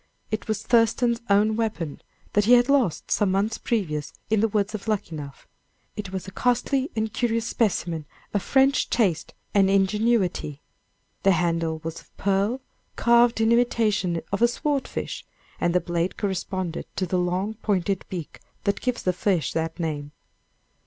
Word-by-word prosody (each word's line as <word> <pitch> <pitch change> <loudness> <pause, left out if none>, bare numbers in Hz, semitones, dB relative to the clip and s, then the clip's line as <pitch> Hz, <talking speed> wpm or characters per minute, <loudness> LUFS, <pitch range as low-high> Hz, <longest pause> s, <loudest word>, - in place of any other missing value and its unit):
It 215 +1 -3
was 215 -2 -2
Thurston's 235 0 +3
own 210 +2 +4
weapon, 215 -9 -2 0.3
that 205 0 +3
he 240 - +6
had 245 +1 +5
lost 260 - +1
some 205 - +3
months 200 +4 0
previous 155 - -1 0.2
in 220 - +4
the 225 - +3
woods 210 0 0
of 215 +1 -6
Luckenough. 160 -10 -4 0.5
It 200 -3 -5
was 190 -1 -5
a - - -7
costly 250 - +1
and 220 -1 -1
curious 230 -1 0
specimen 170 -10 -1 0.3
of 205 - +1
French 270 +4 +3
taste 190 -9 0 0.2
and 195 -2 +4
ingenuity. 195 -6 +1 0.6
The 195 - +5
handle 165 -2 0
was 165 0 -5
of - - -28
pearl, 200 +6 +1 0.3
carved 235 -1 +4
in 225 +1 +3
imitation 215 -8 +2
of 200 - 0
the 235 - +6
sword 280 +3 -1
fish, - - -5 0.4
and 175 0 +1
the - - +6
blade 175 0 -2
corresponded 185 -3 -3
to 185 - 0
the 180 +1 0
long 180 +4 -1
pointed 195 -2 0
beak 175 -5 -6 0.2
that 200 - 0
gives 250 -1 -1
the 185 - +2
fish 180 -2 0
that 165 +1 -2
name. 150 -3 -3
200 Hz, 160 wpm, -25 LUFS, 175-230 Hz, 0.6 s, he